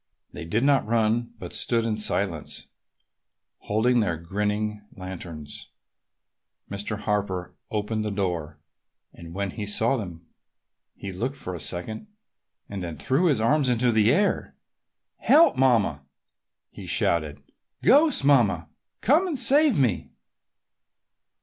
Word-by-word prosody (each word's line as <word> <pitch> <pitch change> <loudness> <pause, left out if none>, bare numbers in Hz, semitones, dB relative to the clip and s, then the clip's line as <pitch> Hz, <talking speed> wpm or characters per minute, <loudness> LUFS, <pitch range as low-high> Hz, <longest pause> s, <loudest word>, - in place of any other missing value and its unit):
They - - -7
did 110 +9 0
not 140 -5 +3
run 115 +1 0
but - - -8
stood 115 -1 0
in 110 -2 0
silence, 95 -6 -2 0.9
holding 120 +4 +1
their 90 -7 0
grinning 105 +4 -2
lanterns. 85 -5 -8 1.0
Mr. 105 +1 -4
Harper 95 -4 -2
opened 110 +1 -2
the 105 - -2
door 90 -7 -3 0.6
and 85 0 -11
when 100 -1 -2
he 105 0 -6
saw 115 +5 +2
them 90 -6 -7 0.7
he 100 - -7
looked 125 +10 -3
for 90 - -6
a 85 - -6
second 90 - -3 0.6
and 100 -2 -6
then 85 -3 -6
threw 135 - +1
his 140 -8 +2
arms 135 +4 +2
up - - +4
into 120 +1 +2
the 110 0 +4
air. 200 +7 0 0.6
"Help, 330 +3 +5
Mamma!" 115 - +2 0.7
he - - -10
shouted. 75 -3 0 0.4
"Ghosts, 295 - +5
Mamma! 135 -8 +3 0.3
Come 320 +9 +3
and 320 -6 -2
save 275 - +4
me!" 120 -10 +1
105 Hz, 130 wpm, -25 LUFS, 90-125 Hz, 1.0 s, Help